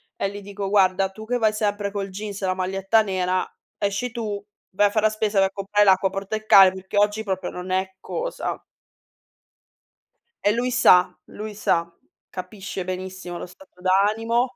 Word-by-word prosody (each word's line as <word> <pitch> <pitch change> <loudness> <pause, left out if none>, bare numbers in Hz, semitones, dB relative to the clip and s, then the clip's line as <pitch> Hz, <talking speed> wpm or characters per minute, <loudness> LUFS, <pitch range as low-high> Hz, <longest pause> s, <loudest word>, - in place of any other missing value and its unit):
E 195 - -1
li 205 +1 -8
dico: 200 0 -5
"Guarda 190 -1 +3
tu 215 +3 -10
che 245 +2 0
vai 220 -2 +2
sempre 205 -1 -1
col 200 -1 -3
jeans 200 +1 -6
e 190 - -1
la 185 - 0
maglietta 195 +4 +1
nera, 185 -2 -1 0.3
esci 200 +4 -1
tu, 215 -4 -4 0.3
vai 205 +2 +3
a - - -1
far 215 +1 0
la 215 - +5
spesa, 215 -1 -1
vai 195 0 +5
a - - -26
comprare 205 +1 +1
l'acqua, 190 0 +4
porta 195 +2 -4
il 215 0 -7
cane, 195 -3 +8
perché 190 +2 -6
oggi 210 +1 +2
proprio 190 -3 -3
non 180 +1 -7
è 190 +1 -1
cosa." - - -4 1.8
E 205 - +4
lui 245 +2 -1
sa 180 -7 +5
lui 215 0 -7
sa. 170 -4 0 0.4
Capisce 190 0 -6
benissimo 185 -1 -5
lo - - -5
stato 180 0 -18
d'animo. 225 +6 +2
200 Hz, 180 wpm, -23 LUFS, 190-215 Hz, 1.8 s, cane